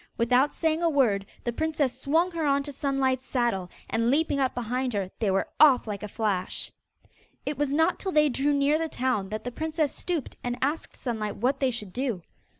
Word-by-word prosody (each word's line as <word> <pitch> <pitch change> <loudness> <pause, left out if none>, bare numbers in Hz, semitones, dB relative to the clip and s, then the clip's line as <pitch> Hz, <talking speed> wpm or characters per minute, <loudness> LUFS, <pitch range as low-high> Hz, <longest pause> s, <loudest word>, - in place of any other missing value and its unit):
Without 250 +5 +3
saying 320 0 0
a 340 - +3
word, 220 -10 +2 0.2
the 240 - -2
princess 285 -3 -1
swung 330 +6 +2
her 335 -2 -3
into 280 +1 -3
Sunlight's 270 -2 0
saddle, 235 -9 -1 0.2
and 230 +1 +1
leaping 285 +1 +2
up 265 -2 +1
behind 245 +1 -1
her, 195 -2 -2
they 215 - +1
were 195 0 +1
off 280 -4 +7
like 205 -3 -4
a 210 - -4
flash. 205 -3 -2 0.7
It 290 - -2
was 290 -1 -1
not 320 +5 +2
till 380 - -3
they 300 -2 +5
drew 280 +2 +1
near 285 +2 +3
the 325 0 -1
town 245 -9 -1
that 215 +1 -4
the 245 - -4
princess 315 +1 -1
stooped 340 -7 -3
and 245 0 -2
asked 290 +4 -2
Sunlight 220 -4 -3
what 260 +5 0
they 265 - +2
should 210 -6 -5
do. 245 -9 -2
260 Hz, 200 wpm, -27 LUFS, 230-295 Hz, 0.7 s, off